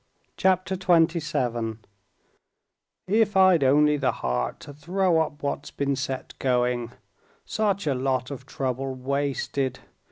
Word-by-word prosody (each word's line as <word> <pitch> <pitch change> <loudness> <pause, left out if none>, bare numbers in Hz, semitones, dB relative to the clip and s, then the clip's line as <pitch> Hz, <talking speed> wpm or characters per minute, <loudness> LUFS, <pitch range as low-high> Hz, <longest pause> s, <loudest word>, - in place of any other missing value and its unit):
Chapter 185 0 +1
27 160 - +1 1.3
"If 210 +1 +2
I'd 185 -5 +6
only 150 +2 +4
the 130 -3 +1
heart 60 0 -2
to 145 - -10
throw 175 +3 +1
up 150 -2 -2
what's 140 - -3
been 140 -1 -1
set 130 0 -4
going... 125 -2 0 0.5
such 205 -2 0
a 145 - +2
lot 130 0 -1
of 135 -1 -8
trouble 130 0 -3
wasted 135 0 -2
140 Hz, 120 wpm, -25 LUFS, 130-170 Hz, 1.3 s, I'd